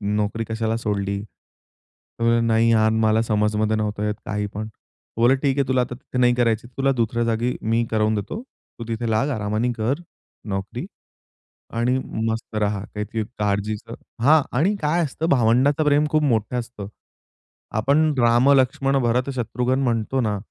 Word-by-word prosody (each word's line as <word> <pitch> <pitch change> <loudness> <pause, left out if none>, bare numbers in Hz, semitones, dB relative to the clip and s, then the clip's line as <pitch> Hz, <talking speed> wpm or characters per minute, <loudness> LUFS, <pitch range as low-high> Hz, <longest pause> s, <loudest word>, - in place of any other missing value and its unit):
नोकरी 105 +2 -1
कशाला 110 0 -1
सोडली?" 100 -2 -2
तो 115 - -15
म्हणला, 115 0 +3
"नाही 115 0 +3
यार, 110 -1 +4
मला 110 0 +2
समजमध्ये 105 0 +1
नव्हतं 105 -1 -2
येत 105 - 0
काही 105 -1 -2
पण." 105 +1 -4
ते 110 +1 -12
बोलले, 125 +3 +5
"ठीक 140 0 0
आहे, 140 - +1
तुला 130 -1 +2
आता 125 0 -3
तिथे 125 0 -8
नाही 120 -1 +4
करायची 115 -1 +1
तुला 135 0 +2
दुसऱ्या 115 +1 0
जागी 115 +2 0
मी 115 +2 +1
करवून 110 0 +2
देतो, 155 - -4 0.4
तू - - -4
तिथे 115 0 -2
लाग, 110 +6 +2
आरामाने 110 +3 -1
कर 130 +9 -1 0.5
नोकरी 95 0 -4 0.9
आणि 125 +3 +1 0.3
मस्त 110 0 -4
राहा, 100 -1 0
काही 105 +1 -3 0.2
काळजीचं" 105 +1 -2 0.3
हां. 155 +2 +6 0.2
आणि 195 +8 +2
काय 165 +3 +1
असतं 160 +4 -3
भावंडाचं 130 +4 +3
प्रेम 145 +1 +4
खूप 155 -1 +2
मोठं 120 -2 +1
असतं. 115 -4 -7 0.9
आपण 150 +6 +3
राम, 120 +3 +4
लक्ष्मण, 135 +1 +2
भरत, 125 +3 +1
शत्रुघ्न 125 +2 -1
म्हणतो 120 +2 0
ना, 105 -3 0
115 Hz, 160 wpm, -22 LUFS, 110-130 Hz, 0.9 s, हां